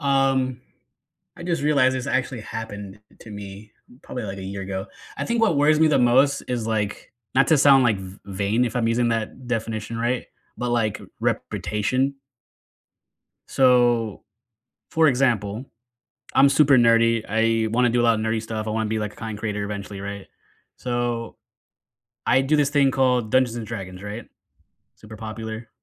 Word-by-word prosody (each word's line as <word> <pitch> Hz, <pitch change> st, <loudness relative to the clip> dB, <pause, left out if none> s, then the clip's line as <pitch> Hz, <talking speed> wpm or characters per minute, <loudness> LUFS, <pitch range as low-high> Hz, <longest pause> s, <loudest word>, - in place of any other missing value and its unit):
Um, 135 Hz, -3 st, +1 dB, 0.8 s
I -, -, -10 dB
just 170 Hz, -3 st, -1 dB
realized 140 Hz, -3 st, +3 dB
this 130 Hz, -, -4 dB
actually 130 Hz, -2 st, -1 dB
happened 105 Hz, -3 st, -7 dB, 0.2 s
to 110 Hz, -, -12 dB
me 105 Hz, +1 st, -9 dB, 0.3 s
probably, 125 Hz, -, -6 dB
like, 100 Hz, -2 st, -5 dB
a 95 Hz, -, -7 dB
year 100 Hz, +1 st, -5 dB
ago. 95 Hz, 0 st, -4 dB, 0.3 s
I -, -, -2 dB
think 235 Hz, -1 st, 0 dB
what 205 Hz, -10 st, +3 dB
worries 150 Hz, +2 st, +4 dB
me 160 Hz, -, +6 dB
the 155 Hz, -, +3 dB
most 130 Hz, +3 st, +4 dB
is, 120 Hz, -3 st, -2 dB
like- 105 Hz, -2 st, -2 dB, 0.2 s
not 135 Hz, +1 st, +4 dB
to 160 Hz, -, +5 dB
sound, 135 Hz, -2 st, +6 dB
like, 110 Hz, -5 st, +2 dB
v 95 Hz, 0 st, -10 dB
vain, 100 Hz, +5 st, 0 dB
if 120 Hz, -, -4 dB
I'm 115 Hz, -2 st, +1 dB
using 120 Hz, +1 st, +1 dB
that 115 Hz, +2 st, -3 dB
definition 115 Hz, -1 st, -3 dB
right- 120 Hz, +2 st, -1 dB, 0.3 s
but, 125 Hz, 0 st, -2 dB
like 115 Hz, -3 st, 0 dB
r -, -, -13 dB
reputation. 130 Hz, +6 st, -1 dB, 1.3 s
So, 120 Hz, -4 st, +3 dB, 0.7 s
for 160 Hz, -1 st, +4 dB
example, 120 Hz, -3 st, +1 dB, 0.7 s
I'm 140 Hz, +1 st, +6 dB
super 140 Hz, -1 st, +5 dB
nerdy, 115 Hz, -1 st, +4 dB
I 115 Hz, +1 st, +1 dB
wanna 120 Hz, +2 st, +2 dB
do 120 Hz, +1 st, +2 dB
a -, -, +1 dB
lotta 115 Hz, -2 st, +3 dB
nerdy 110 Hz, 0 st, -1 dB
stuff, 110 Hz, -1 st, -5 dB
I -, -, -1 dB
wanna 110 Hz, 0 st, -1 dB
be, 110 Hz, 0 st, -1 dB
like, 105 Hz, -1 st, -4 dB
a -, -, -20 dB
content 110 Hz, -2 st, -6 dB
creator 105 Hz, -1 st, -3 dB
eventually, 100 Hz, -1 st, -6 dB
right? 100 Hz, 0 st, -7 dB, 0.5 s
So, 120 Hz, -2 st, -3 dB, 0.9 s
I 130 Hz, -, +4 dB
do 145 Hz, +3 st, +2 dB
this 145 Hz, -2 st, +2 dB
thing 140 Hz, -2 st, +3 dB
called 125 Hz, -4 st, +1 dB
Dungeons 130 Hz, -2 st, +2 dB
and 115 Hz, -2 st, -5 dB
Dragons, 95 Hz, -4 st, -7 dB
right? 105 Hz, +3 st, -7 dB, 0.7 s
Super 110 Hz, 0 st, -12 dB
popular. 110 Hz, +1 st, -7 dB
115 Hz, 170 wpm, -23 LUFS, 105-130 Hz, 1.3 s, me